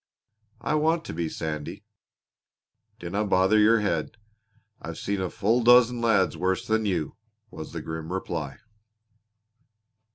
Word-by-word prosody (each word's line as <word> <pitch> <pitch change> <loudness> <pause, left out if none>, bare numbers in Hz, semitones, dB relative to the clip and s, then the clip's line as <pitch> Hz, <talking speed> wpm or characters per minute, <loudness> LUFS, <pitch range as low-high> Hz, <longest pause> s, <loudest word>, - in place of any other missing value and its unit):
"I - - -1
want 160 +2 +1
to - - -6
be, 80 0 -2
Sandy." 75 -2 -5 1.1
"Dinna 95 +5 -3
bother 95 +1 +3
your 110 +1 +5
head. 85 -1 -2 0.6
I've 85 0 -7
seen 95 -2 -2
full 115 +8 +1
a - - -3
dozen 120 0 +5
lads 110 -5 +2
worse 95 +1 -1
than 110 -1 0
you!" 90 -1 -2 0.3
was 80 - -8
the 80 -2 -6
grim 80 +1 -6
reply. 95 +3 -4
95 Hz, 130 wpm, -26 LUFS, 85-115 Hz, 1.1 s, your